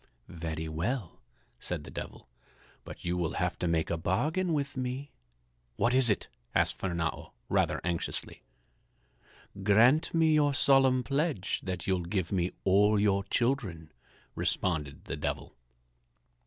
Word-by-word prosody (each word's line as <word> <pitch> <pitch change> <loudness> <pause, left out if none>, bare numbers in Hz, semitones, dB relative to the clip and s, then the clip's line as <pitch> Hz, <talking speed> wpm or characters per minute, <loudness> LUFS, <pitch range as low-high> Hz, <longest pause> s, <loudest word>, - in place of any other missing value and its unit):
"Very 80 -1 -4
well," 90 +6 -3 0.4
said - - -4
the - - -10
Devil, - - -8 0.6
"but - - -10
you 85 +1 0
will 85 -2 -1
have 90 0 -1
to 90 - -1
make 80 -1 0
a 85 - -1
bargain 155 - 0
with 145 -3 -1
me." 130 +2 -4 0.6
"What 120 - +2
is 130 -2 +5
it?" 105 - 0 0.3
asked - - +2
Fernâo, 85 -3 -3 0.2
rather - - +1
anxiously. 85 -1 -3 1.2
"Grant 115 +10 +4
me 160 -1 +3
your 145 -2 +3
solemn 130 -2 +5
pledge 140 - -1
that 90 -2 -4
you'll 95 -2 +1
give 90 0 -2
me 90 -2 0
all 105 +2 +4
your 100 -1 +2
children," 100 - -1 0.4
responded 75 -6 -1
the - - -4
Devil. - - -4
100 Hz, 135 wpm, -30 LUFS, 85-135 Hz, 1.2 s, is